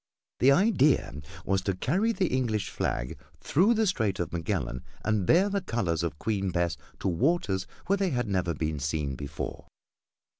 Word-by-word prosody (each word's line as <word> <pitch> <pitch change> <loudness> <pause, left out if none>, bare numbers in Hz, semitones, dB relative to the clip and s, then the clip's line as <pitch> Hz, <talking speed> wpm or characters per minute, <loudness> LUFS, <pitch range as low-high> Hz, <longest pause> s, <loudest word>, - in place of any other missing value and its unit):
This 130 +3 +6
idea 175 - +3 0.3
was 95 0 +1
to 95 0 -1
carry 190 - +1
the 200 -4 0
English 110 -6 -1
flag - - -2 0.2
through 200 +10 +3
the 220 0 +2
Strait 110 - 0
of 85 - -3
Magellan 80 -6 -2 0.2
and 105 -4 +1
bear 185 +4 +5
the 200 -1 -1
colors 90 - -1
of 85 -3 -3
Queen 100 +1 -1
Bess 85 -2 0 0.3
to - - -1
waters 95 - +1 0.2
where 200 +2 +2
they 195 -1 +1
had 125 -6 -1
never 90 -4 0
been 75 0 -2
seen 75 0 -1
before. 70 +2 -6
100 Hz, 165 wpm, -28 LUFS, -, 0.3 s, This